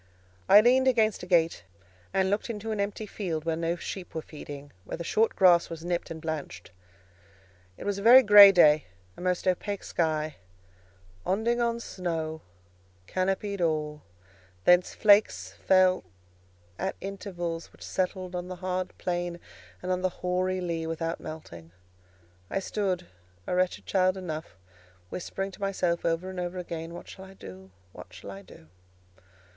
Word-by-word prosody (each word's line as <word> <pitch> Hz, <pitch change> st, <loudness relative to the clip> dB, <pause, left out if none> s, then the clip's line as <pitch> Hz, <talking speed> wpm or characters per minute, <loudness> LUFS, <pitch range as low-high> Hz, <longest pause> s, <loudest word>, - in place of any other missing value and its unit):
I 205 Hz, -, +9 dB
leaned 255 Hz, +3 st, +4 dB
against 220 Hz, -4 st, +3 dB
a 180 Hz, -, -8 dB
gate, 165 Hz, -, +2 dB, 0.5 s
and 190 Hz, 0 st, +1 dB
looked 205 Hz, +4 st, -1 dB
into 220 Hz, 0 st, -4 dB
an 215 Hz, -, -2 dB
empty 200 Hz, +2 st, -2 dB
field 170 Hz, -7 st, -4 dB
where 165 Hz, -1 st, 0 dB
no 165 Hz, +1 st, -1 dB
sheep 175 Hz, +1 st, -7 dB
were 160 Hz, -, -3 dB
feeding, 145 Hz, -2 st, -10 dB
where -, -, -6 dB
the 170 Hz, -, -5 dB
short 220 Hz, +6 st, +1 dB
grass 175 Hz, -3 st, +5 dB
was 165 Hz, 0 st, -7 dB
nipped 175 Hz, -1 st, -2 dB
and 160 Hz, -, -6 dB
blanched. 155 Hz, -, -6 dB, 1.1 s
It -, -, -8 dB
was 200 Hz, -1 st, -1 dB
a -, -, -5 dB
very 245 Hz, +5 st, +9 dB
grey 205 Hz, -2 st, +10 dB
day; 155 Hz, -5 st, +5 dB, 0.3 s
a -, -, -11 dB
most 180 Hz, 0 st, -1 dB
opaque 200 Hz, +2 st, -1 dB
sky, 155 Hz, -2 st, -1 dB, 0.9 s
"onding 230 Hz, +5 st, 0 dB
on 235 Hz, 0 st, 0 dB
snaw," 165 Hz, -7 st, -4 dB, 0.7 s
canopied 195 Hz, -, -1 dB
all; 150 Hz, -2 st, -1 dB, 0.6 s
thence 180 Hz, 0 st, +4 dB
flakes 210 Hz, 0 st, +4 dB
fell 185 Hz, -1 st, +3 dB, 0.8 s
at 190 Hz, -, -2 dB
intervals, 175 Hz, -4 st, -5 dB
which -, -, -14 dB
settled 185 Hz, -1 st, -2 dB
on 180 Hz, 0 st, -4 dB
the 185 Hz, -, -6 dB
hard 185 Hz, 0 st, -3 dB
path -, -, -21 dB, 0.8 s
and 185 Hz, -, -2 dB
on 185 Hz, 0 st, 0 dB
the 185 Hz, -, +1 dB, 0.2 s
hoary 185 Hz, +1 st, 0 dB
lea 165 Hz, -2 st, -2 dB
without 165 Hz, 0 st, -3 dB
melting. 85 Hz, -, -9 dB, 0.8 s
I -, -, -2 dB
stood, 190 Hz, -2 st, -2 dB, 0.4 s
a -, -, -3 dB
wretched 180 Hz, 0 st, 0 dB
child 185 Hz, 0 st, +2 dB
enough, 160 Hz, -, -6 dB, 0.5 s
whispering 195 Hz, -, -4 dB
to 190 Hz, -, -14 dB
myself 180 Hz, -3 st, 0 dB
over 165 Hz, +2 st, 0 dB
and 185 Hz, -1 st, -6 dB
over 175 Hz, +1 st, -4 dB
again, 170 Hz, -1 st, -6 dB
"What -, -, -10 dB
shall 190 Hz, -, -10 dB
I 190 Hz, 0 st, -14 dB
do?—what 95 Hz, -, -13 dB
shall 95 Hz, +2 st, -10 dB
I 100 Hz, 0 st, -9 dB
do?" 90 Hz, -4 st, -16 dB
180 Hz, 155 wpm, -28 LUFS, 165-195 Hz, 1.1 s, grey